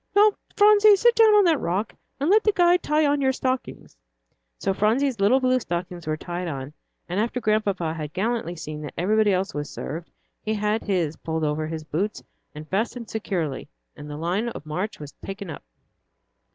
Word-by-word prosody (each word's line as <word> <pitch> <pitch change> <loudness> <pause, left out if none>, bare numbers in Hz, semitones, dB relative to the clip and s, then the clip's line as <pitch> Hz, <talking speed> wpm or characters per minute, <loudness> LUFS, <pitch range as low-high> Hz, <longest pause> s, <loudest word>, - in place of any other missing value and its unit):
"Now, 420 +1 +7 0.2
Phronsie, 420 0 +7
sit 475 +4 +4
down 445 -2 +6
on 415 - +6
that 325 -4 +3
rock, 190 +6 -2 0.3
and 285 - 0
let 430 +2 +5
the 425 - +4
guide 355 -2 +4
tie 300 +1 +2
on 290 0 +2
your 265 -1 +3
stockings." 260 -1 -3 0.6
So 195 - -1
Phronsie's 230 +5 +1
little 210 +7 +4
blue 255 0 +2
stockings 175 -4 -5
were 155 0 -1
tied 175 +2 -5
on, 140 -2 -5 0.3
and 180 +3 -2
after 235 +3 -1
Grandpapa 205 -7 0
had 155 -2 -5
gallantly 205 -2 -2
seen 155 -2 -7
that 150 - -8
everybody 210 +4 +3
else 190 +1 0
was 145 -1 -4
served, 165 +3 -6 0.3
he 215 0 -2
had 210 +1 0
his 170 -6 -1
pulled 160 -1 -3
on 150 - +2
over 155 +1 -2
his 160 -1 -5
boots 185 +8 -3 0.3
and 155 +1 -8
fastened 225 +4 -2
securely, 175 -10 -3 0.3
and 150 - -10
the 145 - -6
line 180 +9 -1
of 155 - -9
march 180 +8 -4
was 145 -2 -8
taken 195 -3 -6
up. - - -8
200 Hz, 190 wpm, -24 LUFS, 160-255 Hz, 0.6 s, Now